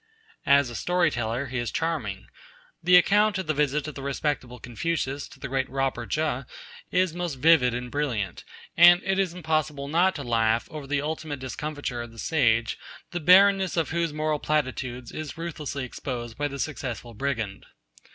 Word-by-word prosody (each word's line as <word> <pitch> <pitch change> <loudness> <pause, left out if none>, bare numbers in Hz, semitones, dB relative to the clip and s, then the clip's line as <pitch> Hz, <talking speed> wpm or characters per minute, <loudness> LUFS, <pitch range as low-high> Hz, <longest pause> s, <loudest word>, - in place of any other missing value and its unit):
As 140 -3 +5
a - - -7
story 175 +1 +1
teller 120 +2 -2
he 130 -1 -3
is 120 - -2
charming. 140 -13 -2 0.6
The 180 +1 +5
account 205 +3 +4
of 190 - -3
the 155 - 0
visit 150 0 0
of 150 - -5
the 135 - -8
respectable 135 -2 -2
Confucius 140 +3 -3
to 145 - -16
the - - -5
great 130 0 -1
Robber 135 -3 -2
Che 155 -4 0 0.5
is 185 -2 +1
most 175 -4 -3
vivid 135 -4 +4
and 125 0 -5
brilliant, 120 -11 -2 0.3
and 175 +1 +8
it 195 +1 0
is 185 -3 0
impossible 155 -4 -1
not 175 +5 +3
to 140 - -5
laugh 115 -1 +1
over 150 -3 -7
the 145 0 0
ultimate 155 -1 -4
discomfiture 140 -1 -4
of 120 -1 -8
the 115 - -16
sage, 115 -5 +1 0.3
the 175 - -2
barrenness 190 +2 +5
of 165 -2 0
whose 170 -1 0
moral 155 0 -1
platitudes 130 -5 -2
is 155 -2 -6
ruthlessly 155 -5 -4
exposed 120 -2 -6
by 145 +3 -1
the 140 -1 -6
successful 125 -5 -4
brigand. 115 -5 -3
145 Hz, 175 wpm, -26 LUFS, 125-160 Hz, 0.6 s, and